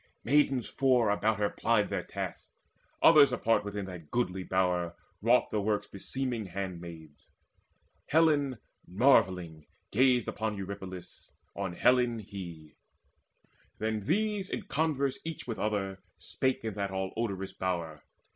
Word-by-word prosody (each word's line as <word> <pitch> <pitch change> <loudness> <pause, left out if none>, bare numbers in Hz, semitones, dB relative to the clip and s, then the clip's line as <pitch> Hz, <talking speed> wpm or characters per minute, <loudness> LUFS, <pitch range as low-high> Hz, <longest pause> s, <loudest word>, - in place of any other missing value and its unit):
Maidens 135 -2 +3
four 125 -5 +3
About 110 +1 +1
her 105 0 0
plied 115 -3 +1
their - - 0
tasks: - - -6 0.5
others 150 -4 +8
apart 115 -4 +2
Within 100 -1 -4
that 90 -5 -9
goodly 95 -6 -1
bower 90 -2 0 0.3
wrought 120 +4 +3
the 105 - 0
works 105 0 0
Beseeming 120 +1 -3
handmaids. 85 -5 -7 0.8
Helen 145 -5 +3 0.3
marvelling 90 - +2 0.2
gazed 125 0 +3
Upon 110 -1 -2
Eurypylus, 95 -2 -8 0.2
on 95 -3 -3
Helen 125 +2 +3
he. 90 -7 -9 1.0
Then 110 0 -1
these 205 - 0
in - - -3
converse 140 -2 0
each 165 -1 -5
with 115 -3 -4
other 100 -3 -1 0.2
spake 130 +11 -1
In 110 - -2
that 100 0 -2
all 95 0 -3
odorous 100 -4 -3
bower. 85 -5 -3
105 Hz, 125 wpm, -30 LUFS, 95-125 Hz, 1.0 s, others